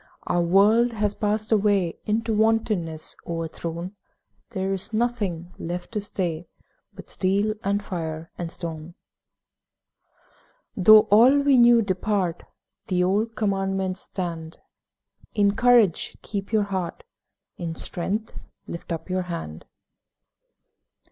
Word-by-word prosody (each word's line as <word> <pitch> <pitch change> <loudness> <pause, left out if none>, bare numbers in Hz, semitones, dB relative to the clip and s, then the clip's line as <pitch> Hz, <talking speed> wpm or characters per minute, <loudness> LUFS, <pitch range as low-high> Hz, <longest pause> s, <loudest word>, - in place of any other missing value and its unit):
Our 175 - +1
world 210 +7 +4
has 210 -2 0
passed 210 +1 -1
away, 200 -5 +2
In 220 +2 0
wantonness 215 -8 0
o'erthrown. 170 +2 -5 0.6
There 190 +1 -2
is 195 +4 -4
nothing 205 -7 -2
left 175 +4 -5
to 215 - -2
day 170 -3 -2 0.4
But 195 -1 -8
steel 200 +3 +1
and 200 +1 0
fire 165 -4 -5
and 170 -2 -5
stone! 165 0 -7 1.8
Though 215 +3 +8
all 240 +7 +7
we 280 -3 +4
knew 235 -1 +6
depart, 185 -2 -1 0.5
The 180 -1 +1
old 210 +5 0
Commandments 195 -2 -1
stand: 165 -5 -5 0.8
'In 200 -1 +3
courage 240 -7 +3
keep 200 -1 -5
your 215 -2 +3
heart, 190 - -4 0.6
In 165 -2 -4
strength 200 +7 -3 0.3
lift 170 - -8
up 165 -1 -4
your 185 0 -1
hand.' 80 - -6
195 Hz, 115 wpm, -24 LUFS, 170-215 Hz, 1.8 s, Though